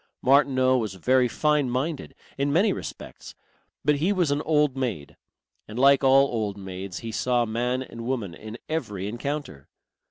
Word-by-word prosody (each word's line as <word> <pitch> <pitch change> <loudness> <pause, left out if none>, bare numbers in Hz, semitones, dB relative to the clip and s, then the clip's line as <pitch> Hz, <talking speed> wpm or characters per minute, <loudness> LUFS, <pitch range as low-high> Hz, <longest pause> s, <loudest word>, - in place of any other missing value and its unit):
Martineau 130 -1 +4
was 105 -5 -4
very 125 +7 +3
fine 150 +1 +1
minded 135 +5 -3 0.2
in 140 +1 0
many 190 +6 +3
respects, - - -9 0.5
but 150 0 +3
he 170 +7 +1
was 180 -7 +1
an 145 +1 0
old 150 -4 +2
maid; 110 - -4 0.5
and 105 - -8
like 140 +1 +5
all 135 +1 +6
old 110 -5 -3
maids 95 -1 -7
he 115 - -5
saw 120 +1 +1
man 125 +3 -1
and 115 -2 -9
woman 115 -9 -2
in 110 +4 -9
every 105 - -3
encounter. 120 - -5
130 Hz, 160 wpm, -25 LUFS, 110-145 Hz, 0.5 s, all